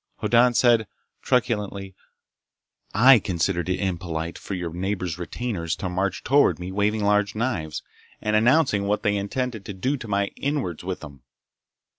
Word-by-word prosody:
Hoddan 120 +1 +3
said 115 -4 +4 0.3
truculently: 105 -6 -1 1.0
"I 125 +4 +7
considered 90 -2 -1
it 90 - 0
impolite 85 -3 -3
for 100 - -5
your 85 -3 -4
neighbors' 90 -2 -3
retainers 90 -3 -3
to 95 - -4
march 95 +1 -2
toward 145 +2 +4
me 90 +1 -6
waving 105 +2 0
large 105 0 +2
knives 100 -10 -2 0.4
and 105 0 0
announcing 110 -3 +3
what 105 +1 0
they 105 0 +2
intended 110 +2 -3
to 100 - -6
do 130 +10 -1
to 120 - -9
my 100 -1 0
inwards 135 - -2
with 95 0 -4
them!" 70 -4 -11
100 Hz, 150 wpm, -24 LUFS, 90-115 Hz, 1.0 s, I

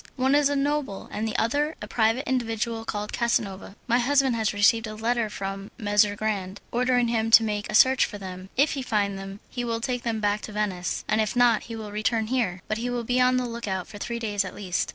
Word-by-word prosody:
One 265 +1 +2
is 290 -1 +4
a 285 - 0
noble 280 -7 -1
and 220 +1 -2
the 220 - -4
other 290 +7 0
a 210 - -7
private 225 +3 +1
individual 230 -2 -1
named 210 0 -4
Casanova. 205 -5 -1
My 240 0 +2
husband 270 0 +3
has 220 -1 +1
received 220 +2 +3
a 215 - -6
letter 230 0 0
from 195 0 -5
Messer 205 -2 +2
Grande 200 -3 -3
ordering 245 0 +2
him 225 -1 0
to 225 0 +8
make 210 -1 -2
a - - -1
search 260 +3 +6
for 205 - -8
them; 185 -1 -8
if 280 +3 +4
he 275 - -3
find 205 -5 -1
them 195 +1 -8
he 245 - -3
will 230 -1 -2
take 245 0 -2
them 230 -2 -2
back 205 0 0
to - - -7
Venice, 200 -4 -2
and 215 +1 +2
if 215 +2 -1
not 245 -2 +4
he 230 - -7
will 215 -2 -7
return 220 +2 0
here, 190 -8 -1
but 215 +1 -2
he 245 +2 -2
will 245 -1 -2
be 245 +2 +1
on 255 0 +4
the 250 - 0
look 235 -2 -5
out 190 -2 -2
for 205 - -10
three 235 +3 -3
days 210 -3 -1
at 185 - -7
least." 185 -3 -2
225 Hz, 240 wpm, -26 LUFS, 205-245 Hz, -, to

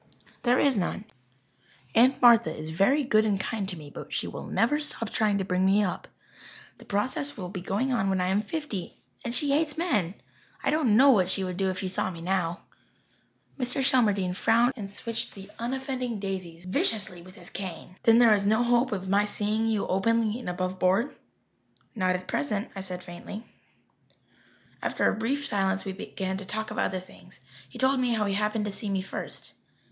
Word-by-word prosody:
"There 245 0 +3
is 270 -7 +3
none. 190 +3 -2 0.9
Aunt 255 +4 +5
Martha 230 -9 +7
is 155 +1 -6
very 255 - +3
good 220 -5 +3
and 205 -3 +1
kind 200 -1 -3
to 180 - -6
me, 150 -2 -11
but - - -9
she - - -1
will - - -7
never 295 +7 +2
stop 230 -7 -2
trying 210 -2 +2
to 195 - -1
bring 180 0 +1
me 195 +2 +4
up. 185 - -3 0.7
The - - -14
process 255 +7 -1
will 180 -3 -5
be 185 -1 -6
going 210 +8 -1
on 220 -5 +1
when 190 -1 +1
I 180 0 +1
am 195 +2 +2
fifty. 220 - -5 0.3
And 235 +1 -2
she 290 -1 +3
hates 300 +2 +2
men! 210 - 0 0.5
I 275 - +2
don't 275 -9 +3
know 275 +2 +8
what 185 -7 +3
she 190 0 -1
would 185 -1 -3
do 190 +1 0
if 185 - -3
she 190 - -3
saw 185 0 -1
me 170 -3 -8
now." 175 0 -1 1.0
Mr. 250 +1 -1
Shelmardine 205 -9 +2
frowned 235 +5 +3
and 205 -5 -6
switched 230 +3 -2
the 195 +1 -11
unoffending 255 -1 -3
daisies 185 -3 -5
viciously 185 -1 +3
with 185 +2 -14
his - - -9
cane. 180 -1 -7
"Then 230 -2 +6
there 235 -2 +7
is 200 -1 +2
no 220 +4 +3
hope 240 +1 +2
of 190 -2 -3
my 200 +2 +3
seeing 210 +2 -1
you 220 -2 0
openly 225 +4 +1
and 240 - -5
above 185 +1 -3
board?" 195 +9 +2 0.8
"Not 185 -4 +1
at 180 0 -6
present," 200 +9 -1
I 195 - -4
said 180 -1 -6
faintly. 185 +5 -8 1.4
After - - +1
a - - +2
brief 265 +6 -1
silence 195 -3 0
we 195 - -3
began 190 -1 -4
to 195 - -8
talk 215 +3 -4
of 215 - -4
other 185 - 0
things. 180 0 -16 0.3
He - - -11
told 265 0 +2
me 250 -2 +1
how 215 -1 +1
he 200 - 0
happened 210 +1 0
to 210 - -3
see 205 +1 -5
me 195 -1 -1
first. 190 - -7
205 Hz, 200 wpm, -27 LUFS, 190-235 Hz, 1.4 s, know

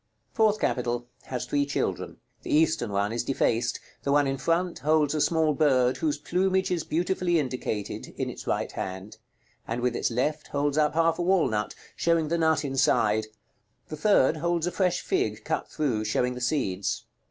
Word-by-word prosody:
FOURTH 215 -1 +3
CAPITAL. 120 -1 -1 0.2
Has 125 -2 -4
three 145 0 +1
children. 140 0 -2 0.2
The - - -9
eastern 155 -6 +2
one 100 +2 0
is 120 - -1
defaced: 120 -2 0 0.2
the 140 - -1
one 145 0 +4
in 135 -1 -2
front 170 +3 0
holds 150 0 +2
a 155 - 0
small 160 -1 +2
bird, 130 -4 +3
whose 150 -2 0
plumage 190 +5 0
is 170 -3 0
beautifully 175 +1 0
indicated, 125 -7 -3
in - - -1
its - - -8
right - - -1
hand; 95 +3 -6 0.5
and 115 +2 -2
with 125 -1 0
its - - 0
left 150 +6 -1
holds 145 0 -1
up 150 -1 +2
half 165 +1 +2
a - - +1
walnut, 160 - +1 0.2
showing 165 -2 +1
the 170 +1 0
nut 160 -2 +2
inside: 110 -5 +2 0.6
the 155 - -4
third 160 -3 +3
holds 170 +1 0
a 180 - -1
fresh 180 -2 +1
fig, 385 0 -1
cut - - -2
through, 130 -9 -1
showing 125 +4 0
the 125 - -7
seeds. 120 -8 -1
145 Hz, 175 wpm, -27 LUFS, 125-165 Hz, 0.6 s, one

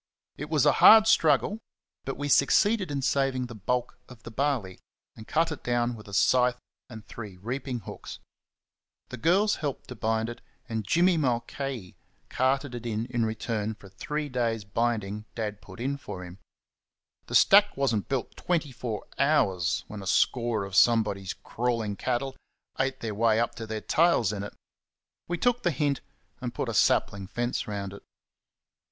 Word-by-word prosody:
It - - -7
was - - +2
a - - +6
hard 220 0 +10
struggle, 165 - +3 0.5
but 135 - -4
we 145 +1 -3
succeeded 195 - +3
in 140 -2 -2
saving 135 -2 +1
the 120 - -9
bulk 120 +4 -2
of 120 -3 -14
the 120 - -9
barley, 120 -7 -1 0.4
and 110 - -12
cut 165 +1 +1
it 155 - -6
down 120 0 0
with 105 -2 -11
a 100 - -11
scythe 125 +4 +3 0.3
and 110 -2 -10
three 105 -5 -9
reaping 125 +4 -4
hooks. - - -9 0.9
The 125 - -7
girls 185 - +3
helped 145 -4 -4
to 125 - -6
bind 110 0 0
it, 120 - -8 0.3
and 110 -2 -3
Jimmy 175 - +4
Mulcahy 125 - -2 0.3
carted 135 +1 0
it 120 -1 -6
in 110 0 -2 0.2
return 110 -1 -2
for 100 -2 -15
three 150 +10 -4
days' 120 -4 -1
binding 105 -1 -2
Dad 105 -2 -4
put 95 +1 -13
in 135 +4 -2
for 90 -9 -8
him. 90 +2 -12 0.9
The - - -3
stack 205 -2 +6
was 140 -3 +1
n't 105 - -3
built 135 -3 -2
twenty 165 -5 -1
four 115 -4 -5
hours 95 - +2
when 105 -1 -8
a 95 - -8
score 115 0 +1
of 95 -1 -6
somebody's 105 -5 +3
crawling 115 -3 -2
cattle 130 +4 -2 0.4
ate 135 0 -1
their 110 -2 -3
way 110 +1 +3
up 115 - 0
to 115 -1 -7
their 110 0 -4
tails 120 - +3
in 100 - -4
it. 105 - -7 0.7
We 175 - -2
took 245 +4 +1
the 175 - +2
hint 145 -2 0 0.4
and - - -5
put - - -2
a - - -3
sapling 100 -1 +2
fence 120 +4 -2
round 100 -2 -4
it. 100 - -11
120 Hz, 170 wpm, -27 LUFS, 105-140 Hz, 0.9 s, hard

